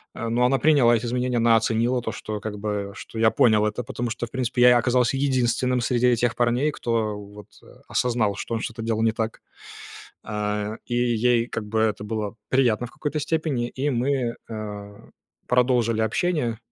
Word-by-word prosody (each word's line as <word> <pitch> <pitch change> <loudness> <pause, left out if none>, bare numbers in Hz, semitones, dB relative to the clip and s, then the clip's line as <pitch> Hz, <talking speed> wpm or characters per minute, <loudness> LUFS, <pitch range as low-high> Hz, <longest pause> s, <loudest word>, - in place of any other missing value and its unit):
э, 115 - -4
но 120 +2 +2
она 135 +2 +2
приняла 140 -7 +5
эти 115 +1 -2
извинения. 125 +1 -1
Она 115 0 +5
оценила 115 +2 +1
то, - - -4
что 105 -1 -5
как 105 0 -6
бы 100 -1 -3
что 115 - -8
я 110 0 +4
понял 110 -3 +4
это, 105 +3 -2
потому 120 -1 -4
что, 120 +1 -4
в - - -23
принципе, 125 -1 -1
я 125 0 +7
оказался 125 +2 +2
единственным 125 -2 +1
среди 125 +1 +2
этих 120 -1 +2
парней, 120 +5 +2
кто 115 -5 -1
вот 105 0 -12 0.2
а - - -18
осознал, 115 -5 +1
что - - -5
он 115 - -2
что-то 115 0 -5
делал 115 -1 -1
не 115 - +3
так 110 0 -4 0.8
а 105 0 -3
и 120 - -3
ей 120 0 +2
как 115 -3 -5
бы 110 +1 -1
это 105 -2 0
было 105 -1 -3
приятно 125 -3 +2
в - - -17
какой-то 150 0 -3
степени, 150 -5 -1
и 135 +4 -2
мы, 125 -1 0
а, 105 -2 -8 0.4
продолжили 125 -3 +2
общение. 120 - 0
120 Hz, 185 wpm, -24 LUFS, 110-125 Hz, 0.8 s, я